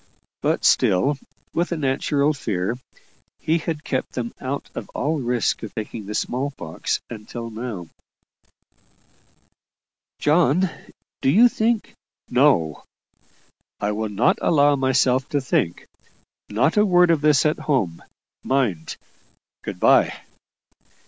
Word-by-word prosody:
But - - 0
still, 135 +10 +3 0.3
with 175 +2 0
a 170 - -1
natural 140 +1 +1
fear, 105 -6 -2 0.6
he 165 +2 0
had 155 -1 -4
kept 130 - -3
them 120 -2 -4
out 135 +2 -4
of - - -7
all 155 +2 0
risk 120 -2 0
of 110 - -8
taking 110 -1 -6
the 105 - -4
small 130 +6 -1
pox 85 - -3
until 115 +1 -7
now. 110 -6 -6 2.3
"John, 165 +3 +3 0.5
do - - +2
you 225 - +7
think 225 -1 0 0.2
" - - -43
"No; 125 - +3 1.0
I 105 - 0
will 110 +1 -2
not 105 +3 +2
allow 145 -2 +4
myself 130 -1 +2
to 145 - +1
think. 120 -10 -1 0.6
Not 125 - +1
a 210 - +6
word 180 -3 +5
of 160 -3 +2
this 150 -2 +4
at 150 - +1
home, 100 - -1 0.4
mind. 115 -12 -1 0.6
Good - - -6
bye!" - - +4
135 Hz, 125 wpm, -22 LUFS, 110-150 Hz, 2.3 s, you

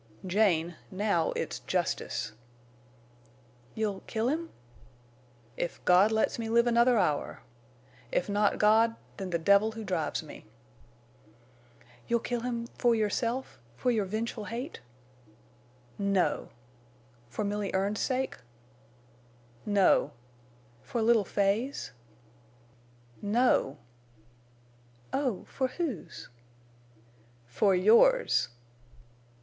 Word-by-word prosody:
"Jane, 175 -4 +1
now 190 -4 0
it's - - -3
justice." - - -2 1.4
"You'll—kill 220 +2 -2
him?" 325 +3 -2 1.1
"If 175 - -3
God 185 +4 +5
lets 220 +1 +1
me 225 -1 -3
live 235 +1 +4
another 240 +1 +4
hour! 150 -8 0 0.7
If - - 0
not 205 0 +1
God—then 215 -2 +1
the 170 - 0
devil 200 +6 +3
who 225 0 -7
drives 180 -5 -2
me!" 155 - -11 1.6
"You'll 235 - +2
kill 240 +1 -3
him—for 235 0 0
yourself—for 220 - -2
your 215 -4 +1
vengeful 215 +2 -4
hate?" 245 +9 -6 1.2
"No!" 200 -2 +1 0.8
"For 170 - -3
Milly 205 -1 -2
Erne's 200 +2 0
sake?" 265 0 -1 1.3
"No." 200 -2 +3 0.7
"For 235 - -2
little 225 -2 +4
Fay's?" 205 +9 -1 1.3
"No!" 205 - +2 1.4
"Oh—for 260 0 -1
whose?" 275 - -5 1.2
_"For 190 - +2
yours!" 235 - +4
215 Hz, 85 wpm, -29 LUFS, 195-235 Hz, 1.6 s, God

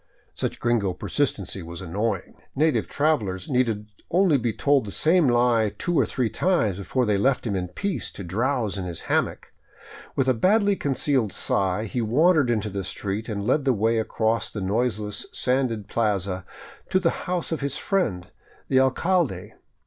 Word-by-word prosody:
Such - - -3
gringo 110 -6 +1
persistency 100 -5 -2
was 85 0 -8
annoying. 95 +2 -2 0.2
Native 155 +2 +2
travelers 110 -12 0
needed 115 -5 +1 0.2
only 175 -4 +4
to - - -5
be 115 0 0
told 140 +2 +2
the 100 - -6
same 165 - +3
lie 120 -4 +3
two 175 -3 0
or - - +3
three 125 -3 0
times 110 - +1
before 125 +6 0
they 105 -2 +1
left 130 +4 +1
him 105 -4 -1
in 90 -1 -2
peace 165 - -3
to 100 - -7
drowse 110 +2 -1
in 95 - -4
his 85 -2 -5
hammock. - - -1 0.6
With 135 -1 +1
a 130 - +4
badly 200 - +3
concealed 135 - 0
sigh 95 +4 0
he 120 +3 -2
wandered 145 +5 +3
into 110 -3 0
the 100 0 -3
street, 100 +4 -4
and 100 -2 -3
led 145 +6 +2
the 135 -1 +3
way 115 +1 +1
across 110 0 0
the 105 - -6
noiseless 105 +1 -1
sanded 125 -5 0
plaza 100 -5 -1 0.4
to 185 - +3
the 170 -3 +2 0.2
house 180 -2 -2
of 160 - -2
his 140 +1 -1
friend 115 - -1 0.4
the 130 - +4
alcalde. 130 - +1
115 Hz, 170 wpm, -25 LUFS, 100-140 Hz, 0.6 s, only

